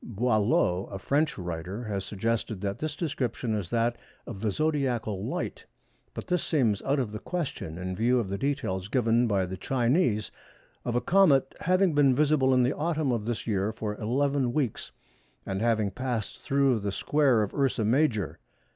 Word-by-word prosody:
Boillot, 105 -5 +1
a 100 - -4
French 145 +8 0
writer, 90 +4 -5
has 100 -4 -3
suggested 110 +1 -2
that 100 0 -3
this 155 -1 -3
description 125 -8 -2
is 100 -5 -3
that 120 0 +1 0.3
of 95 - -8
the 110 - +1
zodiacal 120 -7 -1
light, - - -4 0.5
but - - -5
this 180 -1 0
seems 115 - +1
out 140 +2 0
of 120 -5 -2
the 105 - -5
question 145 - -4
in 90 +1 -4
view 120 +5 +2
of 115 - -2
the 100 +1 -3
details 95 -10 -2
given 120 0 +2
by 100 -3 +1
the 95 +1 -6
Chinese 120 - +1 0.5
of 120 - -1
a 120 - +2
comet 145 -4 +4
having 185 0 +2
been 140 -3 +4
visible 145 -2 +3
in 130 -1 +4
the 125 - +1
autumn 155 -3 0
of 115 -3 -1
this 120 -1 -3
year 105 -1 0
for 110 -1 -4
11 135 +2 +1
weeks, 130 -7 -2 0.5
and 95 +1 -3
having 110 -3 +1
passed 125 -4 -3
through 135 -4 +2
the 100 -1 -2
square 135 -1 +2
of 100 - -5
Ursa 135 -5 +1
Major. 110 - +1
120 Hz, 175 wpm, -28 LUFS, 105-140 Hz, 0.5 s, comet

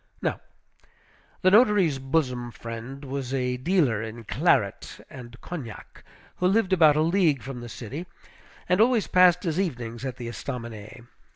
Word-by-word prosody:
Now, - - -2 1.0
the 185 - +5
notary's 205 - +4
bosom 130 -3 -1
friend 115 +4 -8
was 135 -1 -4
a 125 -1 -1
dealer 130 - +1
in 110 +1 -7
claret - - 0
and 120 -2 -11
cognac, 140 -11 -9 0.3
who 180 - +2
lived 195 -1 +2
about 160 -5 +6
a 155 - +2
league 165 -5 +2
from 130 -2 -7
the 120 - -8
city, 135 - -7 0.6
and 180 +3 +3
always 235 -2 +3
passed 180 0 +4
his 165 -1 -1
evenings 120 -10 -3
at 130 -2 -4
the 120 - -6
Estaminet. 120 -2 -7
135 Hz, 150 wpm, -26 LUFS, 120-180 Hz, 1.0 s, about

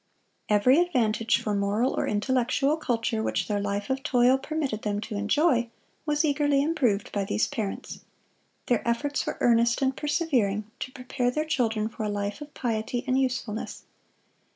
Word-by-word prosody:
Every 230 +8 +5
advantage 235 -10 +2
for 210 - -2
moral 205 +5 +1
or - - -1
intellectual 260 +6 +1
culture 230 -6 -1
which - - -1
their 205 -1 0
life 200 0 -2
of 265 0 -1
toil 255 -2 +3
permitted 275 -7 -3
them 205 -1 -1
to 215 - -6
enjoy, 240 +3 +2 0.4
was 295 +1 +2
eagerly 290 -1 +2
improved 255 -11 0
by 200 - -1
these 195 - +1
parents. 210 -4 -5 0.7
Their 240 - +1
efforts 285 +5 -1
were - - -3
earnest 235 0 +4
and 265 -1 +1
persevering 275 - 0 0.2
to 260 - -5
prepare 250 -1 -2
their 305 +5 -1
children 225 -8 0
for 225 - -8
a 210 - -1
life 205 +4 -3
of 295 0 -8
piety 235 +1 -2
and 260 -1 +1
usefulness. 245 -4 -3
245 Hz, 160 wpm, -27 LUFS, 215-280 Hz, 0.7 s, Every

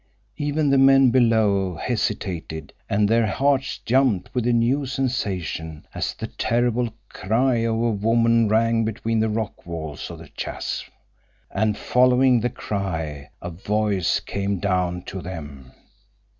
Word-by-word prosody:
Even 145 0 0
the 135 - +4
men 135 -1 +6
below 110 -7 +3
hesitated 85 - -3 0.2
and 105 +1 +2
their 115 +1 +3
hearts 135 +4 +1
jumped 125 -6 +2
with 125 -2 0
a - - +3
new 125 +4 +2
sensation 95 - -3
as - - -3
the - - -5
terrible 120 0 0 0.2
cry 120 +5 +1
of 115 0 0
a 115 +1 +1
woman 115 +2 +3
rang 115 +1 +3
between 110 +1 -1
the 110 0 +2
rock 110 0 -3
walls 80 -3 -6
of - - -8
the - - -12
chasm. - - -5 0.6
And 105 +1 0
following 125 0 +4
the 120 +2 0
cry 80 -10 -4
a 85 - -4
voice 100 +1 0
came 100 0 -2
down 90 -2 -1
to 95 0 -6
them. 75 -8 -8
110 Hz, 140 wpm, -23 LUFS, 95-120 Hz, 0.6 s, men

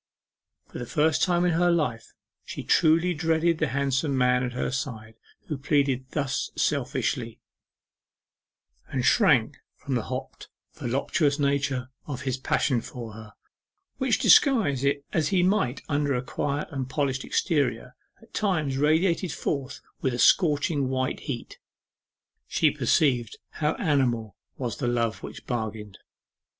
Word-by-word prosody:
For - - -9
the 120 - -5
first 155 +3 +2
time 175 -1 +2
in 175 - +3
her 175 +2 +3
life 145 -10 -1 0.3
she - - -7
truly 165 +3 +3
dreaded 160 +1 +1
the - - +1
handsome 140 +2 0
man 125 0 +3
at 125 -1 -3
her 125 - -2
side 115 -4 -5 0.3
who 150 -3 -4
pleaded 135 -3 +1
thus 135 -2 -2
selfishly, 130 -4 -1 1.5
and 130 -2 -2
shrank 140 - +4 0.2
from 140 - -5
the 120 - +1
hot 130 0 -6 0.3
voluptuous 140 +4 0
nature 140 -3 0 0.2
of 130 -3 -5
his 130 -1 -1
passion 130 -1 +1
for 115 -2 -8
her, 110 -1 -11 0.6
which, 260 -5 +1
disguise 205 - +4
it 140 0 0
as 155 -3 +1
he 180 0 +2
might 180 - +1
under 145 -1 0
a 125 - -2
quiet 145 +3 -2
and 130 -2 -4
polished 135 -2 -1
exterior, 125 - -1 0.3
at 225 - -21
times 160 -10 0
radiated 165 +4 +2
forth 140 -2 -3 0.2
with 130 -2 0
a - - -4
scorching 145 -2 +3
white 130 0 -1
heat. 125 -4 -6 0.9
She - - +2
perceived 125 -7 +1
how 150 -1 -1
animal 120 - 0 0.2
was 120 -4 -3
the 125 - -2
love 115 -2 0
which - - -9
bargained. 110 -4 -4
140 Hz, 140 wpm, -26 LUFS, 125-155 Hz, 1.5 s, shrank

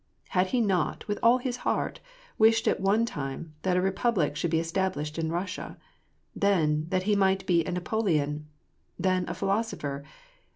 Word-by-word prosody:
Had 185 0 +2
he 245 +4 +1
not, 195 -5 0
with 205 -1 -2
all 235 +2 +6
his 250 -1 -3
heart, - - -1 0.4
wished 225 +1 +5
at - - +2
one 205 +4 +3
time 145 -3 -5
that 185 -1 +1
a - - +3
re 195 - +2
public 195 -8 +1
should 160 +3 -1
be 160 0 +2
established 165 -2 -2
in 160 0 -1
Russia? 180 +3 -4 0.6
then, 160 -6 +2
that 185 0 0
he 210 +1 +2
might 195 -1 +2
be 170 -3 +3
a - - -3
Napoleon? 160 -6 -1 0.5
then, 185 -2 +1
a - - -3
philosopher 195 -9 -2
185 Hz, 170 wpm, -28 LUFS, 160-205 Hz, 0.6 s, all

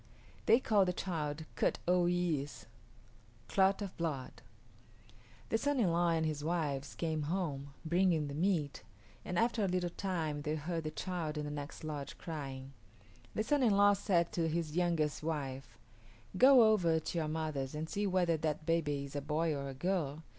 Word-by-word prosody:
They 230 - +7
called 205 -6 +3
the 180 - +1
child 160 -4 -3
Kut - - +1
o 180 0 +4
yis´ 170 -5 -1 0.8
Clot 195 +1 +3
of 195 - -6
Blood. 150 -6 -4 1.1
The 225 - +1
son 285 0 +1
in 195 -7 +3
law 170 +1 +2
and 165 -1 +1
his 150 -2 -2
wives 150 -4 -2
came 160 -2 -1
home, 145 -6 -3
bringing 170 -2 +2
the 140 - -5
meat, 160 -3 0 0.4
and 180 - -3
after 230 0 +2
a - - +2
little 180 -1 -1
time 165 -6 -2
they 150 +1 -1
heard 160 +1 -3
the - - -1
child 160 -1 -3
in 150 - -2
the 145 - -4
next 145 +1 -6
lodge 150 -3 -5
crying. 135 -4 -6 0.6
The 215 - +1
son 290 +5 +2
in 220 -6 +4
law 205 0 +6
said 180 -4 +1
to 165 -2 0
his 160 -1 -2
youngest 170 -4 +1
wife, 135 -6 -4 0.6
"Go 255 +3 +8
over 180 -7 +4
to 160 - -4
your 155 - -1
mother's 150 -3 -3
and 155 +1 -3
see 205 +4 -1
whether 180 -3 +2
that 155 0 -2
baby 145 -4 0
is 140 - -10
a 145 - -1
boy 155 +3 0
or 140 -1 -4
a 135 - -7
girl. 160 -1 -1
165 Hz, 180 wpm, -34 LUFS, 150-180 Hz, 1.1 s, Go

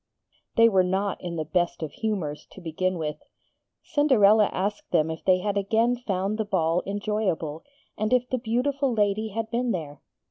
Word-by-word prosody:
They 230 0 +7
were 195 -4 +4
not 190 +2 -1
in 175 -2 -5
the 155 -1 -2
best 175 +1 -1
of 155 - -4
humours, 180 -10 -3
to - - -11
begin 185 +2 -2
with. 150 -2 -3 0.7
Cinderella 220 -8 +4
asked 205 +3 -3
them 160 +1 +2
if 160 - -7
they 185 -1 +4
had 205 0 -1
again 225 +5 +2
found 205 -3 -2
the - - +2
ball 175 -4 +1
enjoyable, 200 -7 -2 0.4
and 215 0 0
if 250 -1 +3
the 255 - -1
beautiful 260 +4 0
lady 215 -1 +1
had 225 +2 -4
been 245 +1 0
there. 155 -8 -4
200 Hz, 175 wpm, -26 LUFS, 175-225 Hz, 0.7 s, They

